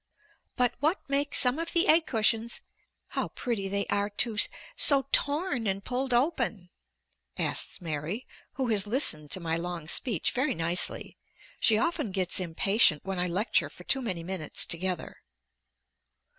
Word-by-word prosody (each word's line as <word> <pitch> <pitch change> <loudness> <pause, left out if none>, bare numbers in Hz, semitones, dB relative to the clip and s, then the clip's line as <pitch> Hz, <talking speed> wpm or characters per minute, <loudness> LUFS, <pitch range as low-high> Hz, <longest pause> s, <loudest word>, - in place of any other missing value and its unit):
"But 245 -1 +2
what 310 +7 -1
makes 280 +1 +2
some 250 +4 +4
of 330 - -4
the 345 +3 +5
egg 320 +1 +5
cushions 225 0 0 0.5
how - - -2
pretty 225 -6 -4
they 200 +1 -1
are, 205 0 0
too! 220 +2 -1 0.4
so 275 -2 +4
torn 285 - +2
and 195 0 -2
pulled 260 +1 -2
open," 240 - 0 0.7
asks - - -1
Mary, 160 - -4 0.3
who 260 -2 -2
has 210 -2 +3
listened 180 - 0
to 185 - -2
my 165 -2 -2
long 170 -2 -5
speech 210 - 0
very 260 +4 0
nicely. 170 +2 0 0.4
She 220 - +4
often 305 -1 -1
gets 185 -1 -1
impatient 185 -1 +2
when 195 -1 -3
I 180 - +1
lecture 190 +7 +1
for - - -14
too 270 - +1
many 185 -9 -4
minutes 180 -4 -4
together. 180 +1 -3
215 Hz, 150 wpm, -28 LUFS, 180-260 Hz, 0.7 s, the